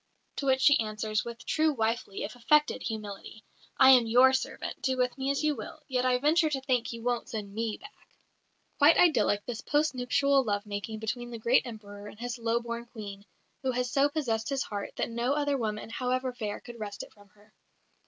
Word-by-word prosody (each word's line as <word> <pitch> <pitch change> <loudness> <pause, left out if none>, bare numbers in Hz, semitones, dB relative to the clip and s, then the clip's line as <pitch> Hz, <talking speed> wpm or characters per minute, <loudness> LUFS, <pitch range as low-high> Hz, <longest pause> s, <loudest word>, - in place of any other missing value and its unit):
To 275 - -2
which 265 0 +3
she 285 +1 +6
answers, 215 0 -1
with 235 0 -8
true 315 0 +2
wifely 225 -4 -2
(if 215 - -6
affected) 300 +5 +2
humility: 215 -1 -6 0.3
"I 265 0 +8
am 245 -3 +6
your 250 +3 +6
servant; 265 - -3
do 260 -1 0
with 250 -1 0
me 270 0 -2
as 280 +2 0
you 305 -1 +2
will; 315 0 -9
yet 255 -2 0
I 250 -1 +3
venture 310 +4 +3
to 275 -3 -2
think 255 -3 0
you 230 -1 -8
won't 245 -1 -1
send 205 -3 -5
me 225 0 -2
back." 415 0 -13 0.9
Quite 300 +3 +7
idyllic, 215 -11 +3
this 235 -2 -5
post 300 +1 +1
nuptial 270 +2 +2
love 205 -2 -1
making 205 +1 -5
between 240 +3 -4
the 235 - -6
great 235 +3 +2
Emperor 205 -3 -9
and 210 - -12
his 245 0 -4
low 230 0 +1
born 235 0 -6
Queen, 205 -4 -9 0.4
who 265 - -1
has 250 0 -1
so 280 +1 +3
possessed 230 -8 -2
his 275 -1 0
heart 205 -1 -6
that - - -2
no 235 +3 0
other 290 -1 0
woman, 220 -3 -3
however 255 +1 -1
fair, 215 -4 -4
could 240 -1 -11
wrest 205 -2 -5
it - - -14
from 205 -1 -20
her. 210 +1 -24
240 Hz, 210 wpm, -29 LUFS, 220-265 Hz, 0.9 s, I